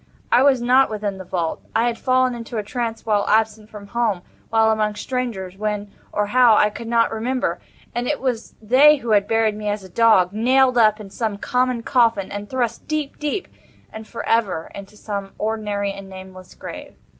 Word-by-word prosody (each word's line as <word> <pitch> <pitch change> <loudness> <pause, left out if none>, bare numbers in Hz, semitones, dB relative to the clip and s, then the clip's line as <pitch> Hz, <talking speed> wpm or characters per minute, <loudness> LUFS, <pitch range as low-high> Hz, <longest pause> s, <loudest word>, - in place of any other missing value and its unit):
I 245 - +5
was 265 -3 +4
not 255 +2 +4
within 205 -2 -4
the - - -6
vault. 170 -2 -3
I 225 - +3
had 240 -1 0
fallen 255 +1 +1
into 230 -1 -6
a 210 - -1
trance 230 +1 -4
while 210 -2 +2
absent 215 0 +1
from 205 -2 -11
home—while 225 0 0
among 215 -1 0
strangers—when, 210 -4 -4 0.2
or 210 - 0
how, 240 +1 +5
I 210 0 +3
could 230 +2 -8
not 230 0 +2
remember—and 245 +1 -4
it 295 - -1
was 245 -4 -3
they 260 +7 +6
who 240 -5 -4
had 205 -1 +3
buried 225 -1 +1
me 210 0 -4
as 205 -1 -3
a 190 - -12
dog—nailed 230 +5 +3
up 215 -1 +4
in 200 -2 -10
some 215 -1 -3
common 250 +1 0
coffin—and 205 -5 +1
thrust 240 -3 -2
deep, 305 -2 -3
deep, 300 +6 -2 0.5
and 220 0 -9
for 230 - -7
ever, 200 -8 0
into 200 +1 -11
some 200 -2 -5
ordinary 210 -2 -2
and 195 -1 -10
nameless 185 -1 -12
grave. - - -9
220 Hz, 180 wpm, -21 LUFS, 205-240 Hz, 0.5 s, they